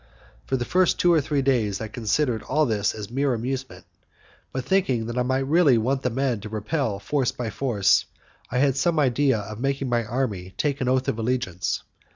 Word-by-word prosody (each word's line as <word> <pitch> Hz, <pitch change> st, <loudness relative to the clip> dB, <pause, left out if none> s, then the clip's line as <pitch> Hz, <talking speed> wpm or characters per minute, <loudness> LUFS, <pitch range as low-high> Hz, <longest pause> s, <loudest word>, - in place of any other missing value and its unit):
For 130 Hz, -, +1 dB
the 120 Hz, -, -3 dB
first 185 Hz, +6 st, +2 dB
two 175 Hz, -1 st, +4 dB
or 160 Hz, -, +4 dB
three 140 Hz, -1 st, -1 dB
days 115 Hz, -7 st, +1 dB
I 110 Hz, -, -4 dB
considered 115 Hz, +2 st, 0 dB
all 150 Hz, +7 st, +1 dB
this 105 Hz, -5 st, 0 dB
as 105 Hz, 0 st, -7 dB
mere 135 Hz, 0 st, +1 dB
amusement, 130 Hz, +3 st, -5 dB, 0.7 s
but, 130 Hz, -1 st, -4 dB
thinking 135 Hz, -11 st, +1 dB
that 120 Hz, +1 st, -5 dB
I -, -, +3 dB
might 130 Hz, +2 st, 0 dB
really 150 Hz, -3 st, +4 dB
want 130 Hz, +4 st, 0 dB
the 125 Hz, -, 0 dB
men 130 Hz, -2 st, -1 dB
to 105 Hz, -, -7 dB
repel 110 Hz, +1 st, -2 dB
force 125 Hz, +6 st, 0 dB
by 115 Hz, -3 st, -4 dB
force, 105 Hz, -6 st, +2 dB, 0.4 s
I 125 Hz, -, -2 dB
had 135 Hz, 0 st, +3 dB
some 165 Hz, +4 st, +1 dB
idea 140 Hz, -2 st, +3 dB
of 105 Hz, +1 st, -7 dB
making 135 Hz, 0 st, -1 dB
my 120 Hz, -1 st, +1 dB
army 105 Hz, -6 st, -3 dB
take 140 Hz, -2 st, -1 dB
an 125 Hz, -, +1 dB
oath 130 Hz, 0 st, +1 dB
of 115 Hz, -, -1 dB
allegiance. 110 Hz, -7 st, -1 dB
125 Hz, 200 wpm, -24 LUFS, 110-140 Hz, 0.7 s, two